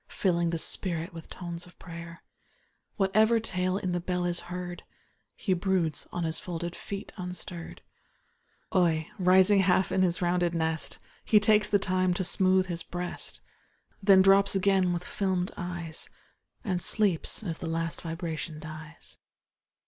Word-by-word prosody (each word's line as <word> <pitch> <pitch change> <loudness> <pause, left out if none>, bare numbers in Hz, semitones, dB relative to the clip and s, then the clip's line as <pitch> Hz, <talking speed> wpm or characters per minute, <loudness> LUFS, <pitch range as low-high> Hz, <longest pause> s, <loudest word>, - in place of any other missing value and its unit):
Filling 170 -3 +1
the 165 - -1
spirit 170 0 -2
with 165 -1 -10
tones 175 -1 -6
of 175 - -18
prayer 170 -1 -9 0.7
Whatever 215 +4 +3
tale 185 -3 -1
in 185 -2 -2
the 175 - 0
bell 180 0 -1
is 175 -1 -1
heard, 180 0 -5 0.7
lie 190 - +5
broods 180 -4 0
on 175 - -2
his 160 0 -2
folded 175 0 -5
feet 200 -1 -7
unstirr'd, 180 -1 -7 0.9
Oi, 165 -4 +3
rising 185 +2 +5
half 185 -1 +3
in 190 - +2
his 180 -2 +2
rounded 175 -1 +1
nest. 160 -1 -1 0.3
He 215 - +5
takes 210 0 +3
the 205 - +4
time 185 -2 +1
to 190 - -1
smooth 185 +1 +3
his 170 -2 -2
breast. 175 0 -5 0.6
Then 195 -1 +7
drops 195 +1 +5
again 190 -1 +3
with 175 0 -2
fdmed 185 -1 -1
eyes, 175 -2 -5 0.5
And 185 -6 -1
sleeps 205 0 +1
as 165 -5 -3
the 170 - -4
last 165 0 -2
vibration 165 -2 -4
dies. 155 +1 -10
180 Hz, 150 wpm, -28 LUFS, 170-190 Hz, 0.9 s, Then